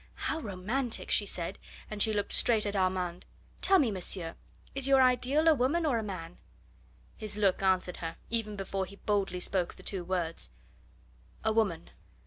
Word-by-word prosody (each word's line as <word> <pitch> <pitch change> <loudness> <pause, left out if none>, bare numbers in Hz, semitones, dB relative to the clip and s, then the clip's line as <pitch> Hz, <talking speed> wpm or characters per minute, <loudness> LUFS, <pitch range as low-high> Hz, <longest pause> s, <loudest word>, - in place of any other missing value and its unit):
"How - - -2
romantic!" 225 +2 -2
she 205 - +3
said, 170 -3 -4 0.3
and 210 -1 -5
she 220 - +4
looked 205 -1 0
straight 225 -3 +5
at 205 0 -2
Armand. 185 -2 0 0.4
"Tell 385 0 +5
me, 260 -10 +3
monsieur, 180 -3 -2 0.4
is 275 -1 0
your 270 -1 +6
ideal 260 +5 +3
a 320 - +8
woman 295 +5 +1
or 255 -7 +2
a - - -3
man?" 180 -4 -7 0.8
His 210 -1 -4
look 195 -3 +2
answered 185 -2 +1
her, 165 -1 -5 0.2
even 220 -3 -1
before 195 -1 -3
he 200 - -12
boldly 200 -3 -1
spoke 180 -1 0
the - - -15
two 190 -3 -3
words: 170 - -3 0.9
"A 220 0 +2
woman." 200 - 0
205 Hz, 170 wpm, -30 LUFS, 185-240 Hz, 0.9 s, a